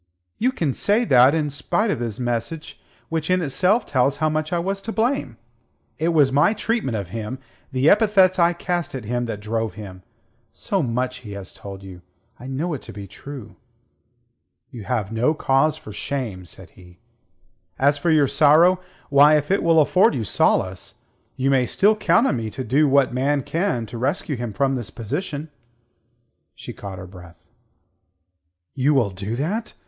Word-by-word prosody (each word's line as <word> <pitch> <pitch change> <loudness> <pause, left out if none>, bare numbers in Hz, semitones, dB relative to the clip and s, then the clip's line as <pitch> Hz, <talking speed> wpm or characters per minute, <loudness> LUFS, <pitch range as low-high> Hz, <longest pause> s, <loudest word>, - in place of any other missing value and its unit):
"You 250 +4 +2
can 160 - -1
say 215 - +1
that, 130 - +5
and 160 - +1
in - - -3
spite 205 +9 -1
of - - -2
his 115 -2 -4
message, 120 +6 -4 0.3
which 160 0 -2
in 185 0 +3
itself 185 - +2
tells 135 0 +1
how 155 +1 +1
much 155 +1 -2
I 175 - +1
was 195 +3 -2
to 225 - -5
blame! 220 - -1 0.6
It 160 - 0
was 150 -5 +3
my 145 +9 +3
treatment 215 - -1
of 100 -4 -5
him, 115 +5 -5 0.3
the 130 +2 +1
epithets 195 -2 +4
I 170 0 +4
cast 175 -3 -3
at 125 -5 -6
him 120 +2 -2
that 105 -3 -5
drove 110 -1 -3
him. 95 -4 -9 0.5
So 195 -2 -2
much 125 -1 -2
he 105 -5 -10
has 100 -2 -9
told 100 -1 -10
you. 95 -2 -11 0.4
I 125 - -9
know 150 +6 -2
it 135 - -5
to - - -10
be 100 0 -8
true." 125 +5 -10 1.1
"You 115 -5 -9
have 105 -1 -2
no 120 +8 +1
cause 150 +2 +2
for 110 - -11
shame," 105 -5 -4
said - - -12
he. 90 -1 -17 0.8
"As 145 +1 +2
for 170 - 0
your 155 -3 +4
sorrow 155 +6 +5 0.3
why, 145 +2 +6
if 150 +3 -3
it 195 - +2
will 165 -1 +4
afford 180 +8 +4
you 120 - -2
solace 95 -2 0 0.4
you 135 +1 0
may 130 -2 +2
still 210 +2 +3
count 230 +3 +3
on 140 - +1
me 110 -1 -4
to 130 - -6
do 145 +4 +2
what 135 -2 +3
man 140 +2 0
can 165 - -1
to 115 +2 -8
rescue 145 +3 -1
him 120 -2 -4
from 135 +6 0
this 120 -7 -4
position." 145 - -5 1.0
She - - -9
caught 100 -2 -8
her 95 - -8
breath. 90 -2 -14 1.4
"You 140 +2 +2
will 115 -7 +2
do 100 +4 -5
that!" 195 - -3
135 Hz, 185 wpm, -22 LUFS, 115-165 Hz, 1.4 s, why